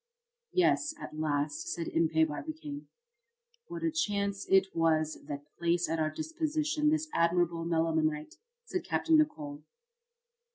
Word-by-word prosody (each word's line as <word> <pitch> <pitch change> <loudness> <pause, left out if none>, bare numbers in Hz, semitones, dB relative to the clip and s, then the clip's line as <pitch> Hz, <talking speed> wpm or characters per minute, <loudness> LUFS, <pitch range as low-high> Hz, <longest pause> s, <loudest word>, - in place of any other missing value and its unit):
"Yes, 310 -4 +2
at 155 - -7
last," 150 0 -1
said 170 -1 -3
Impey 160 -1 +3
Barbicane. 290 - -5 0.8
"What 340 -3 -6
a 325 - +2
chance 200 -9 -1
it 190 0 +4
was 155 -1 +2
that 145 0 -5 0.2
placed 170 0 +2
at 165 +1 -1
our 155 -1 +2
disposition 310 - 0
this 315 0 +1
admirable 170 0 +2
melimelonite!" 160 -2 0 0.3
said - - -3
Capt. 330 - -1
Nicholl. 225 - +2
170 Hz, 125 wpm, -31 LUFS, -, 0.8 s, it